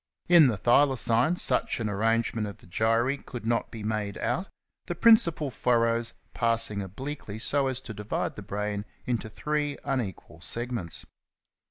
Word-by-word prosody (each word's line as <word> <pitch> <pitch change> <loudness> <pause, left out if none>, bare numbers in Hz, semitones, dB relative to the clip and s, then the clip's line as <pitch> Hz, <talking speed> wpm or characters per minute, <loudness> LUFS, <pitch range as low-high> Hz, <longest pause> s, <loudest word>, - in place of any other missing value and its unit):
In 170 -4 +8
the 115 -5 0
Thylacine 125 - +3
such 125 - +2
an 115 - -1
arrangement 115 +1 0
of 100 - -8
the - - -18
gyri 115 +9 +1
could 120 -4 -8
not 115 0 0
be 110 -2 -8
made 105 -1 -2
out, 190 +2 -1 0.4
the 175 - -3
principal 170 - +4
furrows 115 -1 +1 0.2
passing 115 -3 +1
obliquely 110 +3 -6
so 140 +4 +1
as 130 -1 -1
to 120 -4 -8
divide 105 0 -3
the - - -8
brain 105 0 -3 0.2
into 120 -3 -2
three 150 +4 -2
unequal 95 - -4
segments. 120 -5 -2
115 Hz, 150 wpm, -27 LUFS, 105-135 Hz, 0.4 s, In